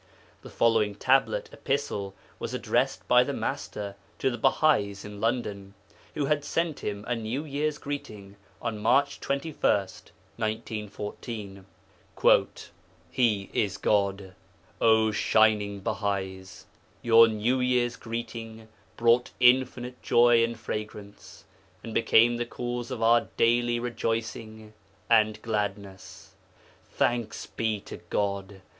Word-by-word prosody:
The - - -11
following 110 -3 +2
Tablet 135 - +2
(Epistle) 120 -9 -3 0.2
was - - -4
addressed - - -1
by - - +6
the - - -3
Master 100 -1 -4 0.2
to 130 - 0
the 120 - -4
Bahais 110 -7 +2
in 105 0 -9
London, 105 -4 -2 0.4
who 150 -2 0
had 145 0 0
sent 165 0 -1
Him 105 0 -5
a 120 - 0
New 115 +6 -4
Year's 150 +1 -2
greeting 105 -10 -7 0.3
on 115 -3 -3
March 140 +6 +2
21, 140 +3 -4
1914: 105 0 -4 1.5
'HE 105 -6 +1
IS 100 -2 0
GOD! 100 -2 0 0.5
'O 110 -1 +4
shining 105 -2 +2
Bahais! 95 -3 -3 0.4
Your 115 0 +7
New 115 +4 0
Year's 125 -1 +1
greeting 115 -1 -7 0.3
brought 120 +1 +3
infinite 125 0 +2
joy 120 -1 +5
and 115 0 -2
fragrance, 105 -2 -7 0.4
and 115 - -7
became 115 +1 +4
the 120 - -2
cause 120 0 -4
of 125 -3 -4
our 115 +1 +4
daily 120 +1 +2
rejoicing 115 -2 -4 0.4
and 110 -1 +4
gladness. 100 -3 -5 0.6
'Thanks 120 -3 -1
be 110 -2 -2
to - - -9
God! 100 -1 -2
115 Hz, 115 wpm, -27 LUFS, 105-120 Hz, 1.5 s, Your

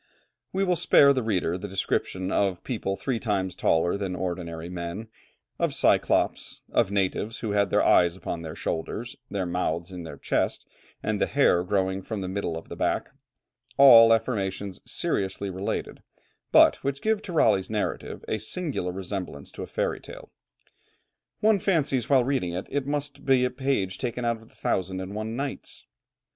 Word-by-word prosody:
We 195 +1 0
will 180 -2 +2
spare 140 -2 +6
the 130 - 0
reader 95 -5 0
the - - -5
description 95 0 -2
of 95 -3 0
people 105 -6 -2
three 125 +2 -2
times 95 -5 -1
taller 85 +2 +2
than 95 -2 -3
ordinary 85 -3 -4
men, 90 +5 -6 0.5
of - - 0
cyclops, - - +1
of 115 -5 +2
natives 100 +2 -1
who 110 - -2
had 100 -1 +2
their - - +3
eyes 85 -1 +4
upon 85 -2 -5
the 80 -1 -7
shoulders, 110 +8 -4
their 100 -2 -2
mouth 85 0 -2
in 90 -1 -7
the 80 -2 -8
chest, - - -1 0.4
and - - -1
the - - +3
hair 90 - +3
growing 95 0 0
from 105 +1 -5
the 95 - -3
middle 95 -3 -2
of 80 - -9
the - - -7
back - - -1 0.7
all 115 -5 +9
affirmations 100 -4 -1
seriously 95 0 -1
related, 95 +2 -4 0.5
but - - +7
which 140 0 -4
give 220 -1 +1
to 190 - -8
Raleigh's 100 - +3
narrative 110 -1 -3
a 110 - -1
singular 125 - -3
resemblance 90 -5 -6
to - - -9
a - - -5
fairy - - -1
tale. - - -12 1.1
One 215 -1 +4
fancies 150 - +1
while 135 -3 +5
reading 125 -10 -1
it 90 +2 -4
that - - -17
it 140 -1 -1
must 145 0 -3
be 130 -2 +4
a 125 - -1
page 125 -8 -1
taken 125 -1 -3
out 115 -1 +1
of 115 - -18
the - - -25
Thousand 95 0 -1
and 95 +1 -6
one 110 +2 -4
Nights. 140 +2 -5
100 Hz, 175 wpm, -26 LUFS, 90-125 Hz, 1.1 s, all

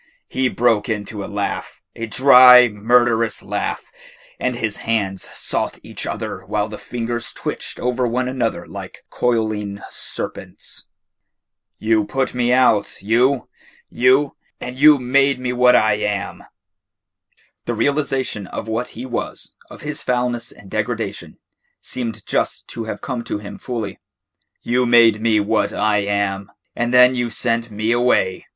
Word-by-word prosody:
He 130 0 0
broke 115 -4 +1
into 105 -1 -4
a - - -6
laugh, 100 -1 -4 0.2
a 115 - -5
dry, 125 0 +8
murderous 115 +1 +1
laugh, - - -4 0.5
and 125 - -1
his 110 -3 -2
hands 100 -4 -2
sought - - -2
each - - -5
other - - -5
while 105 0 -1
the 105 -1 -8
fingers 120 -1 -4
twitched - - -4
over 125 0 0
one 125 +2 -1
another 125 -3 -2
like - - -9
coiling 110 -4 -1
serpents. - - -6 0.9
"You 110 -1 +1
put 130 +6 -2
me 125 -1 +1
out 120 -7 +2
you 125 +5 +2 0.4
you, 130 +3 +3 0.2
and 125 +1 -7
you 150 0 +7
made 135 +1 +2
me 125 -1 -2
what 125 0 +5
I 110 -1 +3
am." 105 -2 -3 1.2
The - - -2
realisation 135 -8 -1
of 110 - -6
what 110 +2 -3
he 125 - -5
was, 130 - -4 0.2
of - - -11
his 150 0 -3
foulness 125 -1 -1
and 105 - -15
degradation, - - -3 0.4
seemed 120 -3 -5
just - - -1
to 115 - -5
have 105 -2 -6
come 120 - -4
to - - -3
him 105 0 -9
fully. 110 -6 -5 0.6
"You 125 +1 +1
made 115 -3 +5
me 110 -1 +3
what 105 +1 +1
I 105 -1 +1
am, 100 -1 -2 0.2
and 120 0 -1
then 125 0 +7
you 120 -1 -1
sent 115 0 -1
me 110 +2 -2
away. 120 -6 +1
115 Hz, 145 wpm, -20 LUFS, 105-125 Hz, 1.2 s, dry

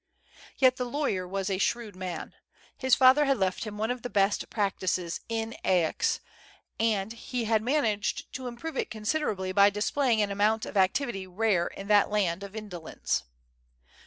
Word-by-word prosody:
Yet 255 -1 +4
the 250 - -1
law3"cr 220 -11 -1
was 195 0 -2
a 190 - -1
shrewd 220 -1 -1
man. 185 -3 -6 0.4
His 260 -2 +3
father 265 +3 +6
had 275 -1 +2
left 190 +2 -1
him 210 -1 -6
one 220 +3 0
of 250 -1 -4
the 245 - -5
best 200 -1 +1
practices 185 -4 -1
in 225 0 -2
Aix, 175 -4 +1 0.6
and 220 -2 +1
he 240 +1 -4
had 220 -1 +2
managed 225 -5 0
to 260 -1 -5
improve 260 +7 -6
it - - -1
considerably 210 -4 -1
by 200 +1 +6
displaying 220 +4 +1
an 200 - -2
amount 215 +2 +1
of - - -8
activity 195 +1 +1
rare 185 -2 +1
in 195 - -8
that 205 -1 +5
land 195 -4 0
of 200 0 -8
indolencp. 200 -7 -3
210 Hz, 165 wpm, -28 LUFS, 195-240 Hz, 0.6 s, father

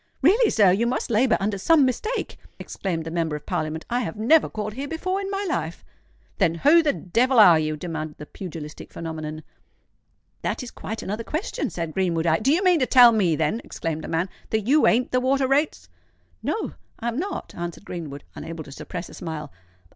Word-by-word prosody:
"Really, 425 - +5
sir—you 205 +2 +4
must 245 0 -2
labour 230 +1 +3
under 200 0 -1
some 300 - +5
mistake," 430 - -2 0.2
exclaimed 165 -5 -4
the 165 - -5
Member 165 -2 -1
of 150 - -8
Parliament. 155 +1 -3
"I 245 - 0
have 190 -10 -3
never 270 +9 +4
called 215 -1 -4
here 275 +5 -5
before 370 +5 -2
in 390 - -4
my 400 0 -2
life." 165 - -3 0.5
"Then 165 - +3
who 300 - +5
the 305 -3 +2
devil 245 +5 +1
are 180 -7 +8
you?" 155 0 -1
demanded 155 -2 -5
the 150 - -8
pugilistic 155 -3 -8
phenomenon. 155 -1 -6 1.0
"That - - -2
is 245 - -8
quite 220 0 -6
another 210 +4 -3
question," 330 - -3
said 165 -2 -4
Greenwood. 170 -3 0
"I——" 160 -1 +3
"Do 265 +6 +2
you 345 +6 +2
mean 360 -3 +4
to 255 - +1
tell 245 -2 +8
me, 190 -8 +2
then," 160 +9 0
exclaimed 160 -2 -4
the - - -6
man, 165 +3 0 0.2
"that 220 - +1
you 275 +9 +4
ain't 245 +3 +2
the 255 - +3
Water 265 +1 +2
Rates?" 285 +3 0 0.5
"No—I 250 - -5
am 235 +3 -1
not," 380 +2 -4
answered 175 +3 -6
Greenwood, 150 -5 -6
unable 165 -1 -7
to 140 - -13
suppress 175 +5 -6
a - - -13
smile. 155 -4 -6
210 Hz, 195 wpm, -24 LUFS, 165-265 Hz, 1.0 s, are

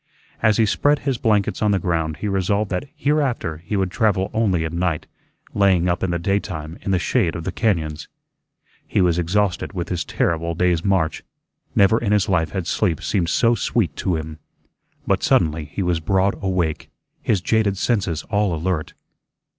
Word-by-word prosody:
As 110 -2 +3
he 115 - +4
spread 145 +7 +2
his 135 -4 0
blankets 105 -3 +1
on 105 - +3
the 100 - +3
ground 80 -3 -1
he 105 - -1
resolved 100 +1 0
that 90 +8 -2
hereafter 140 - 0
he 85 +6 -5
would 95 -2 0
travel 105 -4 +1
only 95 -7 +1
at 80 - -4
night, 85 -3 -1 0.5
laying 95 -3 +3
up 85 0 0
in 95 - 0
the 85 - 0
daytime 85 -3 -3
in - - -5
the 95 - +3
shade 85 -1 +1
of 85 - -5
the 95 - -3
cañóns. 80 -9 -1 0.8
He - - 0
was 90 -2 +3
exhausted 95 +3 0
with 85 -3 -4
his 90 -2 -1
terrible 85 +2 -1
day's 85 -1 +1
march. 95 -6 +1 0.5
Never 100 +3 +5
in 105 -3 0
his 105 0 +2
life 90 -5 +1
had 95 -4 -3
sleep 80 -2 0
seemed 90 -5 0
so 115 +5 +3
sweet 110 -8 0
to 90 - 0
him. 80 0 -6 0.7
But - - +1
suddenly 80 0 +2
he 75 +7 -4
was 90 -2 +1
broad 95 +4 +1
awake, 90 -5 -1 0.3
his 105 - +1
jaded 100 +1 +1
senses 95 -7 0
all 100 -4 +1
alert. 80 -1 -2
95 Hz, 180 wpm, -21 LUFS, 85-105 Hz, 0.8 s, Never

